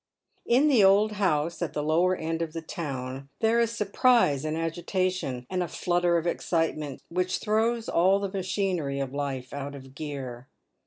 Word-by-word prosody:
In 260 +5 +4
the 255 -8 +5
old 200 +3 +5
house 170 -6 0
at 170 - -2
the 150 - -2
lower 170 +4 +3
end 165 0 -3
of 160 -2 -3
the 165 - -4
town 135 -6 -5
there 225 +1 +3
is 235 -1 +3
surprise 210 - +3
and 155 +1 -1
agitation, 165 -5 -2
and 185 -1 -2
a 175 - -1
flutter 175 +2 +1
of 165 - -2
excitement 160 -5 -1
which 180 +1 0
throws 225 +2 0
all 185 +4 +4
the 200 -1 -2
machinery 185 -7 -1
of 135 -1 -3
life 135 -3 -4
out 140 0 -5
of 135 -1 -12
gear. 135 -4 -6
170 Hz, 170 wpm, -27 LUFS, 145-195 Hz, -, the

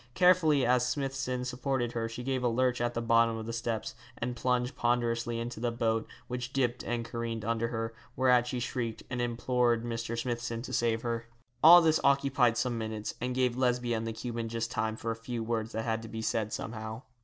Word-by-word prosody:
Carefully 170 -6 +5
as 125 0 +3
Smithson 130 -1 -2
supported 125 -1 -1
her 115 -1 -2
she 120 +2 -6
gave 130 0 -1
a - - +3
lurch 125 +1 +1
at 120 0 -1
the 115 - -1
bottom 115 0 +3
of 110 - -5
the 115 - -4
steps, 115 -1 -2 0.2
and 120 +1 -3
plunged 125 +1 0
ponderously 120 -1 0
into 120 -1 -5
the 120 +1 0
boat, 115 -1 0 0.2
which 125 0 -4
dipped 125 -2 0
and 120 -1 -2
careened 115 -2 -4
under 115 0 0
her, 115 -1 -3 0.2
whereat 125 -2 +4
she 125 0 -2
shrieked, 120 -2 -3
and 125 -1 -1
implored 120 -1 +1
Mr. 115 0 -3
Smithson 120 -1 -3
to - - -7
save 115 -1 +1
her. 115 -1 -2 0.4
All 170 +2 +10
this 160 -1 +4
occupied 135 -4 +3
some 120 -3 0
minutes, 110 -1 -4
and 125 +1 -2
gave 125 -2 +2
Lesbia 125 -2 +1
and 115 0 -2
the - - -1
Cuban 115 0 -4
just 115 +1 -3
time 110 -2 -1
for 115 +1 -3
a - - -2
few 115 0 -4
words 115 0 -2
that 110 0 -2
had 110 -1 0
to 115 - -8
be 110 +1 -5
said 110 -1 0
somehow. 110 +2 -5
120 Hz, 210 wpm, -30 LUFS, 115-125 Hz, 0.4 s, All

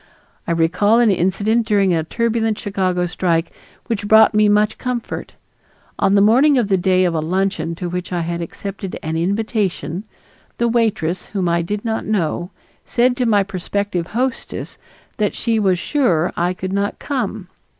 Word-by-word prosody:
I - - 0
recall 180 +7 +3
an 235 -3 +4
incident 205 +5 +1
during 200 -4 +3
a 160 -1 +1
turbulent 225 +3 0
Chicago 185 -3 -1
strike 170 -1 0 0.3
which 205 -3 -3
brought 220 +1 +6
me 210 0 +4
much 210 +1 +2
comfort. 250 -2 -4 0.6
On 195 - +3
the 200 - +5
morning 265 +6 +5
of 230 -5 +1
the 190 - +3
day 185 0 +2
of 175 - +1
a 160 - 0
luncheon 170 0 -1
to 175 +1 -4
which 180 +1 -4
I 175 -1 -1
had 170 +1 -3
accepted 195 +2 -6
an 160 +1 -3
invitation, 195 -1 -1 0.5
the 235 - +1
waitress, 220 -7 0
whom 190 -3 -2
I 170 0 +2
did 205 +6 -4
not 220 -1 -1
know, 175 -4 -1 0.3
said 245 +1 +2
to 250 - +1
my 205 -3 +4
prospective 190 -2 -3
hostess 255 +3 -3 0.4
that 210 -2 0
she 230 -2 0
was 190 -3 +2
sure 180 - +1
I 175 +1 0
could 185 +1 -4
not 200 +1 -1
come. 220 -8 -3
200 Hz, 170 wpm, -19 LUFS, 175-220 Hz, 0.6 s, brought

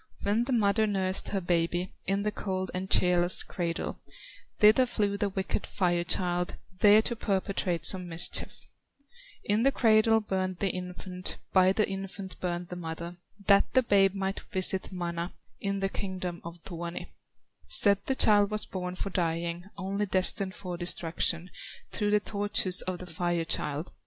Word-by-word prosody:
"Where 210 +4 +1
the 260 - -4
mother 220 -2 +2
nursed 190 -2 -1
her 200 - -1
baby, 175 +1 0
In 195 +1 0
the 210 - 0
cold 190 -3 -3
and 185 +1 -4
cheerless 180 0 +4
cradle, 170 -2 -4 0.6
Thither 220 +4 +6
flew 205 -4 0
the 200 0 -1
wicked 195 +1 -3
Fire 175 -2 0
child, 175 0 0 0.2
There 210 +2 +6
to 235 - -1
perpetrate 190 -5 -1
some 180 0 +3
mischief; 165 0 +1 0.8
In 210 +2 +1
the 275 +3 +4
cradle 225 -2 +4
burned 185 -3 -2
the 195 -1 0
infant, 180 0 -5 0.2
By 185 -1 +5
the 210 +2 +1
infant 195 0 -7
burned 175 -1 -3
the 180 - -6
mother, 170 0 -6 0.3
That 200 -1 +4
the 260 - +5
babe 195 -3 +3
might 195 0 -2
visit 190 +1 0
Mana, 175 -1 -4 0.3
In 200 0 -2
the 195 - 0
kingdom 185 -3 -5
of 170 0 -10
Tuoni; 170 -1 -6 0.6
Said 200 -1 +3
the 265 - +1
child 205 -4 +4
was 215 0 +2
born 180 -1 -5
for 195 +1 -4
dying, 170 0 -2
Only 200 +2 -2
destined 190 0 +3
for 180 -2 -6
destruction, 170 0 0 0.4
Through 210 - -1
the 210 0 +4
tortures 205 -3 +1
of 185 -1 -4
the 180 - -9
Fire 175 0 -2
child. 150 0 -2
185 Hz, 160 wpm, -29 LUFS, 175-200 Hz, 0.8 s, Thither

